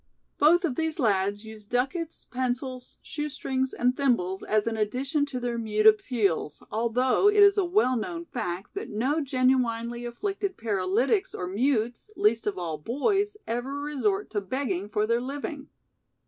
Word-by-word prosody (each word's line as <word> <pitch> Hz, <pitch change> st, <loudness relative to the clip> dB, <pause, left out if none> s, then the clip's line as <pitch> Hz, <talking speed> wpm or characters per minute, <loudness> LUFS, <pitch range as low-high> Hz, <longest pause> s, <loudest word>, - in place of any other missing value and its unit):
Both 345 Hz, +5 st, +5 dB
of 300 Hz, -, -1 dB
these 320 Hz, -1 st, -1 dB
lads 205 Hz, -, +1 dB
used 215 Hz, -1 st, -11 dB
duckets, 305 Hz, +7 st, -2 dB
pencils, 255 Hz, 0 st, -3 dB
shoestrings 265 Hz, -3 st, -2 dB
and 250 Hz, +1 st, +1 dB
thimbles 210 Hz, -10 st, +1 dB
as 215 Hz, -1 st, +1 dB
an 230 Hz, -1 st, -1 dB
addition 260 Hz, +7 st, 0 dB
to 255 Hz, -3 st, -4 dB
their 240 Hz, -1 st, -2 dB
mute 215 Hz, -1 st, 0 dB
appeals, 215 Hz, -, +2 dB
although 245 Hz, -, +3 dB
it 415 Hz, 0 st, +6 dB
is 400 Hz, 0 st, +7 dB
a 400 Hz, -3 st, +2 dB
well 345 Hz, -8 st, +2 dB
known 335 Hz, +9 st, -4 dB
fact 195 Hz, -, -5 dB
that 400 Hz, +2 st, -5 dB
no 265 Hz, +9 st, 0 dB
genuinely 250 Hz, -3 st, +1 dB
afflicted 390 Hz, -, -3 dB
paralytics 225 Hz, -, 0 dB
or 180 Hz, -, -3 dB
mutes, 235 Hz, -, 0 dB
least 220 Hz, +1 st, +2 dB
of 205 Hz, -, -1 dB
all 165 Hz, -4 st, -3 dB
boys, 395 Hz, -, 0 dB
ever 245 Hz, +5 st, -3 dB
resort 300 Hz, +8 st, -1 dB
to 205 Hz, -, -1 dB
begging 200 Hz, -3 st, -2 dB
for 210 Hz, 0 st, +1 dB
their 235 Hz, +2 st, +1 dB
living. 280 Hz, +2 st, -5 dB
250 Hz, 155 wpm, -27 LUFS, 215-290 Hz, -, is